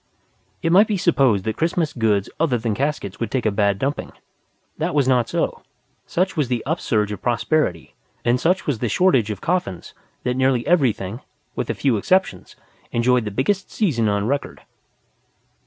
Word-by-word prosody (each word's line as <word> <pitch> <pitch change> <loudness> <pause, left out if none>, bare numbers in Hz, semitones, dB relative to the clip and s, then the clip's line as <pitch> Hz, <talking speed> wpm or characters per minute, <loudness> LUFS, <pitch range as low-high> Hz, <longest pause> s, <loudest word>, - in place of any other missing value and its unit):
It 165 - +1
might 200 +5 +6
be 210 - 0
supposed 135 - +2
that 110 +1 -3
Christmas 165 -1 0
goods 105 -4 +1
other 150 -6 +2
than 110 -1 -2
caskets 135 -5 -3
would 115 - -2
take 130 -1 -2
a 110 - +3
bad 100 -1 +1
dumping. 140 +7 -3 0.7
That - - -1
was 140 -3 +3
not 125 -3 +2
so. - - -1 0.5
Such 185 +2 0
was 150 -5 +1
the 120 -2 -2
upsurge 115 - 0
of 105 - -6
prosperity, 120 - 0 0.3
and 120 +1 +3
such 180 +7 +1
was 135 -7 -1
the 120 - -1
shortage 135 - +3
of 105 -2 -5
coffins, 170 - -2 0.3
that 125 - 0
nearly 130 -2 +1
everything 120 - +1 0.3
with - - -3
a - - -1
few 130 -6 +1
exceptions 180 - 0 0.4
enjoyed 120 0 +2
the - - -2
biggest 185 - -1
season 125 - +1
on 100 0 0
record. 140 +4 -3
125 Hz, 170 wpm, -21 LUFS, 110-155 Hz, 0.7 s, might